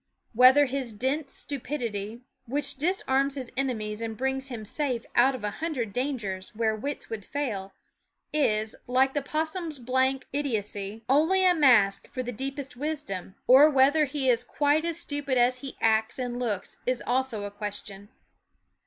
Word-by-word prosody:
Whether 255 +5 +7
his 260 -3 -3
dense 270 +6 -2
stupidity, 235 -6 -4 0.3
which 280 +2 -2
disarms 275 -4 +1
his 260 -4 -6
enemies 225 -5 -2
and 225 -1 -4
brings 265 +1 -1
him 230 -4 -6
safe 250 0 -1
out 260 +3 +4
of 250 - -8
a 210 - -1
hundred 260 -8 -3
dangers 225 -8 -3
where 220 -1 +1
wits 280 +5 -5
would 220 -3 -4
fail, 205 -8 -3 0.6
is, 215 -7 +1
like 260 +2 +3
the 290 - 0
possum's 315 +2 -3
blank 260 +2 +1
idiocy, 215 -6 -2
only 320 +8 +4
a 365 - +6
mask 240 - +4
for 255 - -4
the 245 - -4
deepest 270 +3 -5
wisdom; 275 - -4
or 270 +5 +8
whether 290 +2 +4
he 280 -1 -2
is 240 -2 +4
THE - - -14
WOODS - - -27
H - - -21
quite 295 +2 +3
as 335 -1 -2
stupid 285 -3 -2
as 250 +1 +3
he 270 +1 -8
acts 220 0 +2
and 245 -1 -3
looks 210 -7 -3
is 255 -1 0
also 245 -4 0
a 205 - -5
question. 205 -1 -6
255 Hz, 170 wpm, -27 LUFS, 220-285 Hz, 0.6 s, or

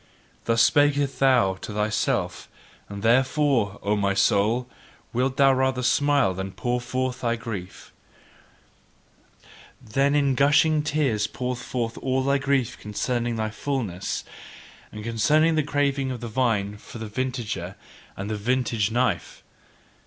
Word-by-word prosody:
Thus 115 0 +3
speakest 145 -1 +2
thou 125 -8 +4
to 105 - -6
thyself; 105 0 -1 0.4
and 100 0 -7
therefore, 130 -3 +2
O 105 +1 +1
my 100 -1 0
soul, 110 +6 +2 0.5
wilt 130 +2 0
thou 135 -1 +5
rather 130 -1 0
smile 140 -5 +3
than 95 +1 -5
pour 125 0 -2
forth 130 +1 -3
thy 115 -1 +1
grief 105 -6 -8 1.9
Than 135 +6 0
in 140 -2 +3
gushing 145 +3 +4
tears 140 -9 0
pour 125 -1 -3
forth 120 -1 -4
all 130 0 0
thy 140 +1 +2
grief 135 -4 0
concerning 120 +3 -2
thy 110 -1 -2
fulness, 110 -8 -3 0.7
and 105 0 -8
concerning 150 +9 +2
the 155 - +2
craving 140 -2 0
of 125 -2 -4
the 120 - -6
vine 110 -4 0
for 110 - -11
the 110 - -6
vintager 110 -5 -4 0.4
and 100 +2 -4
vintage 115 -1 0
knife! 115 -7 -1
125 Hz, 130 wpm, -24 LUFS, 105-135 Hz, 1.9 s, thou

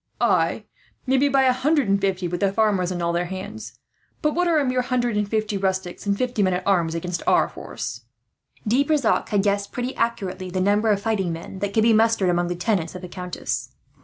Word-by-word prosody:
"Ay, - - +1 0.4
maybe 265 +2 +3
by 270 -1 +3
a 255 -1 +4
hundred 285 +1 +1
and 200 0 +2
fifty, 190 -2 0
with 175 +1 -3
the 200 -1 +2
farmers 200 -4 +1
and 175 -2 -3
all 170 0 0
their 175 +1 0
hands; 200 +4 -7 0.5
but 300 0 +2
what 355 +3 +1
are 335 -2 +3
a 255 -3 +1
hundred 245 -2 0
and 210 -1 0
fifty 215 -1 -1
rustics 190 0 -2
and 200 0 +1
fifty 250 -3 -1
men 185 -2 +2
at 180 - -4
arms, 170 -4 +2
against 175 0 -3
our - - +4
force?" 115 0 -7 0.6
De 250 +6 +3
Brissac 285 -4 +1
had 200 -2 +2
guessed 200 0 0
pretty 245 +1 -3
accurately 195 -6 -2
the 185 +1 -2
number 205 +3 +2
of 205 -2 +3
fighting 200 -4 -1
men 165 +3 -7
that 200 0 -2
could 220 +2 +2
be 230 0 +5
mustered 220 -4 +3
among 175 0 +1
the 175 - -2
tenants 180 -2 -1
of 185 - -8
the - - -5
countess. 180 0 -5
200 Hz, 220 wpm, -23 LUFS, 180-235 Hz, 0.6 s, be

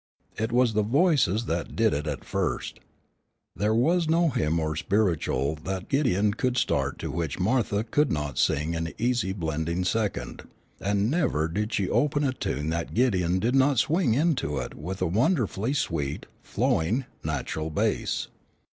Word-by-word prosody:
It 110 +1 -2
was 120 -1 +3
the 105 - +2
voices 120 - +2
that 85 0 -3
did - - +3
it 75 +2 -2
at 75 -3 -4
first. - - -2 0.8
There 105 +2 +1
was 165 +7 +2
no 165 +1 +3
hymn 80 - 0
or 80 -1 -1
"spiritual" 80 -7 0
that 95 -1 -4
Gideon 105 -8 +2
could 125 +2 -1
start - - 0
to - - -4
which 80 -3 -3
Martha 105 +1 +1
could 145 +6 +1
not 75 -4 -2
sing 75 +4 +1
an 80 0 -3
easy 120 -4 0
blending 85 -1 -2
second, 110 +1 -2 0.3
and 100 +3 0
never 140 - +1
did 105 +7 -2
she 100 -4 0
open 145 +7 +1
a 135 -2 +1
tune 75 - -3
that 85 0 -3
Gideon 95 -8 +2
did 115 +6 0
not 135 0 +4
swing 145 - +2
into 140 - +1
it 65 - -4
with 90 +5 -5
a - - +3
wonderfully 115 - +1
sweet, 75 - -2 0.2
flowing, 110 +12 0 0.2
natural 75 +1 -3
bass. 75 - -1
105 Hz, 160 wpm, -26 LUFS, 80-125 Hz, 0.8 s, not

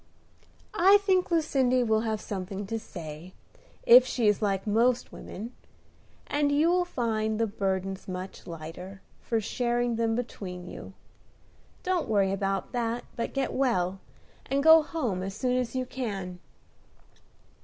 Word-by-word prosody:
"I 395 0 +6
think 375 -2 +3
Lucindy 270 -7 +2
will 220 -2 +2
have 220 -1 -1
something 195 0 -5
to 225 +3 -3
say, 165 -3 -9 0.5
if 245 +2 +9
she 245 -3 0
is 210 0 +3
like 195 -2 0
most 235 +4 +2
women, 225 +6 -8 0.7
and 290 0 +1
you 305 +4 +3
will 360 0 +2
find 220 -8 -1
the 230 - +3
burdens 195 -2 -3
much 185 0 -7
lighter, 175 +4 -8 0.2
for 230 - -1
sharing 240 +1 -1
them 225 -1 +1
between 185 -7 -5
you. - - -9 0.9
Don't 365 -2 0
worry 200 -3 +3
about 195 -1 -2
that, 235 0 -2
but 230 - -3
get 275 -1 -1
well, 195 -8 0 0.5
and 275 +1 0
go 320 +1 +9
home 260 - -2
as 195 +1 -5
soon 250 +2 0
as 250 0 -1
you 255 0 -1
can." 195 -9 -5
225 Hz, 145 wpm, -28 LUFS, 195-255 Hz, 0.9 s, if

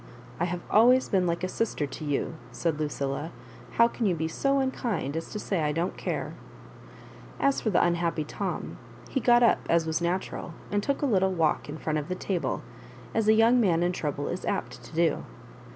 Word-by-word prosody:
"I 175 - +2
have 175 0 -3
always 250 +4 +6
been 185 -2 +2
like 170 +1 -1
a - - +1
sister 195 -6 -1
to 140 +3 -8
you," 145 +2 -1 0.2
said 165 -3 -1
LucUla; 145 0 -2 0.2
" 120 +1 -18
how 235 - +7
can 235 -2 -1
you 180 - +2
be 160 0 -1
so 275 +12 +1
unkind 235 - -1
as 165 - -4
to - - -5
say 195 -4 -1
I 150 -1 +1
don't 170 +4 -1
care - - -3 0.5
?" - - -18
As 275 - -1
for 220 - 0
the 190 - +4
unhappy 170 -2 0
Tom, 185 +5 -4 0.3
he 270 - 0
got 240 -1 +5
up, 235 - +5
as 165 -1 +3
was 160 +1 -1
natural, 175 -1 -2 0.2
and 205 0 +1
took 280 +6 -1
a - - +4
little 190 -7 +3
walk 160 -4 +1
in 150 - -5
front 155 -1 -1
of 150 - -6
the 185 - -2
table, 185 -1 -2 0.5
as 220 -1 +1
a 220 - +7
young 230 +3 +5
man 175 -5 +3
in 175 - +2
trouble 145 -5 -3
is 180 - -4
apt 200 - -3
to - - -12
do. 165 -2 +2
175 Hz, 215 wpm, -28 LUFS, 160-220 Hz, 0.5 s, how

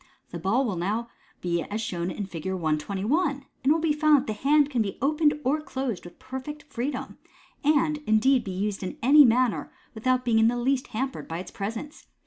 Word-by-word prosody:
The 170 - -5
ball 210 +10 +1
will 200 -7 -2
now 215 +7 -2 0.3
be 170 -1 0
as 210 +6 -4
shown 180 -5 -3
in 200 +2 -4
Fig. 170 -3 -7
121, 190 - 0
and 275 - -14 0.2
it 270 - +3
will 315 - +4
be 320 -2 +1
found 305 0 +5
that 270 - -1
the 215 - -2
hand 290 +5 +3
can 245 -4 +1
be 200 -3 -3
opened 300 +2 +2
or 285 +4 +1
closed 260 - -4
with 175 - -12
perfect 265 +3 -7
freedom, 270 0 -5 0.4
and, 305 +1 +3
indeed, 240 +4 +4
be 195 - -6
used 195 +2 -2
in 185 - -5
any 290 +4 +8
manner, 245 -2 +2 0.2
without 255 +3 0
being 225 -2 +3
in 225 - +5
the 240 +1 +1
least 255 +2 0
hampered 265 +4 -4
by 165 - -4
its 180 0 -7
presence. 225 +9 -6
245 Hz, 205 wpm, -26 LUFS, 200-285 Hz, 0.4 s, any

